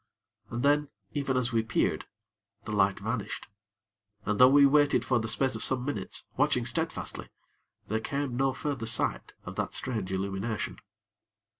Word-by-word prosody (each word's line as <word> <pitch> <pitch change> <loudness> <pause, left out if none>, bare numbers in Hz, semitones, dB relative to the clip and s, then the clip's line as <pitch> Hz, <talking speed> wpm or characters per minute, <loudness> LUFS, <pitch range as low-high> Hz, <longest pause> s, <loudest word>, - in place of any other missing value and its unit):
And 120 +2 -3
then, 145 +1 +3 0.2
even 140 -3 -1
as 120 -1 +1
we 115 - +3
peered, 110 - 0 0.6
the - - -5
light 100 -1 +2
vanished, 110 0 -4 0.8
and 105 +1 -1
though 125 0 +9
we 140 +1 +7
waited 145 0 +4
for 125 -2 +2
the 115 - -3
space 130 +4 +2
of 110 - -2
some 130 +1 +2
minutes; 145 - -3
watching - - +2
steadfastly, - - -2 0.6
there 110 +2 0
came 140 +1 -3
no 135 +1 +2
further 130 -3 -3
sight 115 - 0
of - - -8
that - - -2
strange 110 -7 -2
illumination. 100 +3 -3
120 Hz, 155 wpm, -29 LUFS, 110-140 Hz, 0.8 s, though